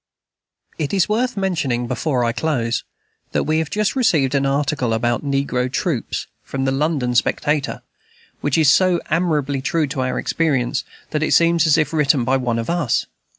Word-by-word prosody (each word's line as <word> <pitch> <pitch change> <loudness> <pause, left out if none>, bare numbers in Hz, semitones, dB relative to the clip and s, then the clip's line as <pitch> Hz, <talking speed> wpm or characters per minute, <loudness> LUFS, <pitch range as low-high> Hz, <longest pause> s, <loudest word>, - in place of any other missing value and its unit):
It 155 +4 -1
is 190 -2 +3
worth 235 +2 0
mentioning, 160 -11 -1
before 125 +1 -1
I 115 - +1
close, 120 -2 -1 0.5
that - - +1
we 155 +1 +1
have 160 -2 -2
just 210 +2 0
received 155 - +2
an 140 -1 +2
article 140 -3 0
about 120 +3 0
"Negro 135 -3 -1
Troops," 160 - -2 0.2
from 135 -1 -4
the 135 - +1
London 135 -3 0
Spectator, 145 +4 0 0.6
which 145 0 0
is 155 -4 +5
so 185 +1 +3
admirably 150 -6 0
true 160 +3 0
to 135 -1 -3
our 130 0 -1
experience 135 -5 0 0.3
that 150 - -1
it 155 - +2
seems 170 -1 +4
as 155 0 +5
if 155 -1 0
written 150 -4 +3
by 130 +2 +2
one 120 -3 -1
of 115 - -3
us. 170 -8 0
145 Hz, 175 wpm, -20 LUFS, 130-165 Hz, 0.6 s, is